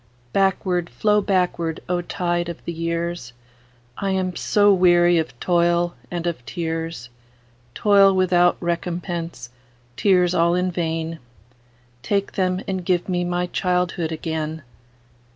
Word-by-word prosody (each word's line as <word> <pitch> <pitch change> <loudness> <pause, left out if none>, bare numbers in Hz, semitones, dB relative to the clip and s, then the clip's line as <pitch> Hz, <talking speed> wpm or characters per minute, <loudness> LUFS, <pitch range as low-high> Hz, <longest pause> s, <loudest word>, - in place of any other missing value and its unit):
Backward, 185 -2 +1
flow 210 -1 +2
backward, 180 -4 0
O 180 0 0
tide 175 0 -2
of 170 - -8
the - - -3
years!I 125 -5 -6
am 185 -2 -1
so 205 -1 +3
weary 175 -2 +4
of 145 -7 -5
toil 175 0 +2 0.2
and 175 -1 -4
of 170 -8 -3
tears,—Toil 125 - -1
without 180 -2 +3
recompense, 170 -5 -4 0.4
tears 180 +1 +3
all 170 0 +3
in 180 0 0
vain,—Take 120 - -5
them, 185 -1 0
and 190 -1 -2
give 175 0 0
me 180 -1 0
my 175 0 -1
childhood 180 -2 -1
again! 160 -1 -4
170 Hz, 115 wpm, -22 LUFS, 155-180 Hz, 0.4 s, weary